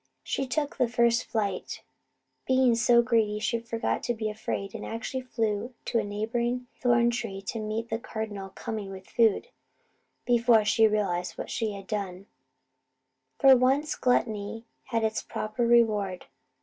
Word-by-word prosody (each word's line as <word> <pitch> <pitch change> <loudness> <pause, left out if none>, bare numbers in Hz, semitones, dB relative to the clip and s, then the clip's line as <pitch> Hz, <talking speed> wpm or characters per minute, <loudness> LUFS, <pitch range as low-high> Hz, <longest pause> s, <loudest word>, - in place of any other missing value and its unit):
She 270 - -2
took 290 +2 -2
the 250 -3 +3
first 235 0 +2
flight, 200 -4 -3 0.6
being 260 -2 +4
so 235 +1 +4
greedy 225 -3 +2
she 230 +2 -1
forgot 230 0 -2
to 240 - 0
be 215 -1 -2
afraid, 200 -2 -4
and - - -6
actually 230 +3 -4
flew 230 -1 -2
to 230 - +1
a - - -1
neighbouring 235 +4 -2
thorn 240 -1 +3
tree 225 -5 -4
to 225 +3 -4
meet 215 +2 -3
the 225 - -1
Cardinal, 215 -4 -5
coming 205 +1 -5
with 190 -1 -9
food, 230 - +2 0.8
before 235 -2 +4
she 220 +1 +5
realized 190 -4 -1
what - - -6
she 220 -3 -1
had 195 -1 -8
done. 195 -3 -4 1.1
For 270 -1 +7
once 270 +4 +2
gluttony 225 -2 0 0.2
had 230 -3 -1
its 220 0 0
proper 215 +3 -2
reward. 210 -6 +2
225 Hz, 150 wpm, -28 LUFS, 210-240 Hz, 1.1 s, For